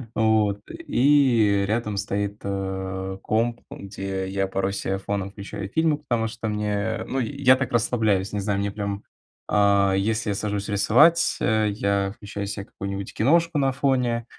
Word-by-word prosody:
Вот. 110 -2 +2
И 125 - +3
рядом 110 -2 -1
стоит, 100 +1 -2
э, 95 -1 -4
комп, 115 +2 0
ам 100 - -8
где 95 -1 -4
я 95 0 -1
порой 95 +1 -1
се 95 -1 -2
фоном 100 0 -3
включаю 100 -1 -7
фильмы, 160 +1 +1
потому 120 -6 -1
что 115 0 -5
мне 105 0 -1
ну 135 - -2
я 130 +1 +3
так 130 0 -3
расслабляюсь, 110 -4 +1
не 105 - -1
знаю, 100 0 -1
мне 100 0 -1
прям, 100 -1 -4 0.5
а, 100 -2 +3
если 110 +2 0
я 100 - 0
сажусь 105 0 -3
рисовать, 150 +12 +4
э, 110 0 +2
я 100 -1 0
включаю 100 -1 -6
себе 100 -1 -5
какую-нибудь 100 0 -6
киношку 165 +6 +2
на 135 -1 +2
фоне, 125 -4 0
105 Hz, 160 wpm, -24 LUFS, 100-120 Hz, 0.5 s, рисовать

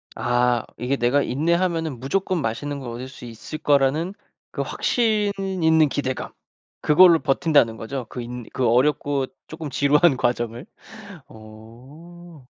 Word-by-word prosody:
아 120 0 +1
이게 130 +3 -1
내가 125 +4 +2
인내하면은 165 -1 -1
무조건 180 +5 -1
맛있는 140 +5 -3
걸 125 -3 -7
얻을 120 +2 -6
수 125 -2 -12
있을 115 +7 -8
거라는 145 +6 +1 0.4
그 - - -3
확신 215 -4 0
있는 160 -5 +2
기대감 130 -2 -3 0.5
그걸로 165 +2 +6
버틴다는 135 -6 +2
거죠? 125 +2 -5
그 125 - -6
인 120 -1 -7
그 125 -2 0
어렵고 135 +2 +1 0.2
쪼끔 160 -2 -7
지루한 145 +2 +3
과정을? 120 +2 -2 0.6
어. 130 +9 -14
140 Hz, 270 characters per minute, -22 LUFS, 125-165 Hz, 0.6 s, 그걸로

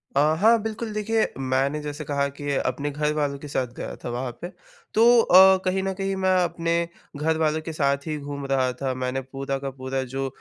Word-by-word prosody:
अ, - - +4 0.2
हाँ 225 +3 +5
बिल्कुल 220 0 -4
देखिए, 215 +1 +1
मैंने 135 +2 0
जैसे 150 +1 -5
कहा 140 0 0
कि 145 -1 -3
अपने 135 +3 -1
घर 150 +1 0
वालों 145 -2 -1
के 150 - -9
साथ 130 -3 -1
गया - - -5
था - - -4
वहाँ 125 +1 -3
पे। 175 - -4 0.5
तो 220 - +5 0.2
अ, 190 -1 +7
कहीं 185 +1 +1
न 195 0 -1
कहीं 195 0 -2
मैं 190 -1 +2
अपने 170 -1 -1 0.4
घर 160 +2 0
वालों 155 0 +1
के 160 +1 -6
साथ 140 -2 0
ही 155 -1 -2
घूम 140 -1 -6
रहा 130 -2 +2
था 135 -1 0
मैंने 130 +1 -2
पूरा 135 +1 -4
का 135 0 -4
पूरा 130 0 -4
जो 135 0 -1
145 Hz, 215 wpm, -24 LUFS, 135-180 Hz, 0.5 s, अ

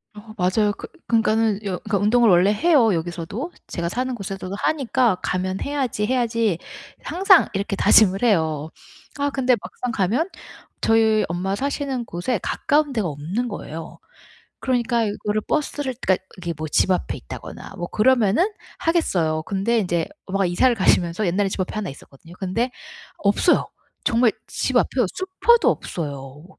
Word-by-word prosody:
어. 215 +1 -11
맞아요. 200 +3 +2
그 - - -8 0.2
그니까는 220 -2 +2
여 185 -2 -2
그니까 215 -2 -1
운동을 225 +3 +4
원래 180 +3 +5
해요, 260 - +4
여기서도. 175 - -4 0.2
제가 170 0 -3
사는 255 +4 -2
곳에서도 195 -2 -5
하니까 255 -7 +2
'가면 185 +1 -1
해야지, 265 -7 -1
해야지.' 230 -6 +1 0.5
항상 380 +1 +5
이렇게 200 +1 -2
다짐을 200 +1 +5
해요. 160 -8 +1 0.5
아 285 0 +1
근데 260 -3 +2
막상 250 -1 -5
가면 225 - 0 0.5
저희 220 -1 +3
엄마 190 +3 -1
사시는 275 -1 -2
곳에 180 +5 -2
가까운 295 -1 +1
데가 215 -7 0
없는 165 +12 -3
거예요. 165 -6 -7 0.6
그러니까 240 -2 +1
이거를 210 +1 -2
버스를 290 -1 -2
그니까 190 -1 +2 0.2
이게 170 -2 -4
뭐 155 0 -4
집 170 - +2
앞에 180 - -1
있다거나 - - -9
뭐 175 0 -4
그러면은 245 - +3 0.3
하겠어요. 170 - +1
근데 205 +5 0
인제 175 -4 0 0.2
엄마가 195 0 0
이사를 240 +8 +3
가시면서 185 -1 +2
옛날에 195 +3 +1
집 190 - -5
앞에 185 - -4
하나 215 -3 -3
있었거든요. 140 +4 -14
근데 230 +7 -1 0.5
없어요. 205 - +2 0.3
정말 230 0 +3 0.2
집 255 -2 0
앞에요 245 -2 +2
슈퍼도 385 +5 +3
없어요. 145 -1 -5
210 Hz, 350 characters per minute, -22 LUFS, 180-250 Hz, 0.6 s, 원래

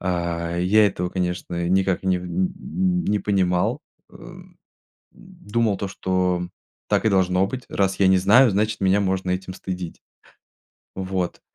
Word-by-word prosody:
А, 85 -2 -2
я 105 +5 +4
этого, 90 -2 -2
конечно, 90 -1 -3
никак 95 0 +1
не 95 -1 +1
н 90 - -1 0.6
не 105 - +1
понимал, 95 -3 0 0.3
э, - - -20
м, - - -14 0.5
думал, 105 0 -3
то 100 - -3
что 90 -2 -1 0.4
так - - +1
и 110 - +5
должно 95 -1 +2
быть. 125 +4 -6
Раз 95 -1 0
я 95 - +5
не 95 0 +5
знаю, 110 +8 +5
значит, 105 +2 -1
меня 95 +1 +3
можно 95 -1 -1
этим 95 0 -3
стыдить. 90 -2 -6 0.9
Вот. 95 -2 -3
95 Hz, 145 wpm, -23 LUFS, 90-100 Hz, 0.9 s, и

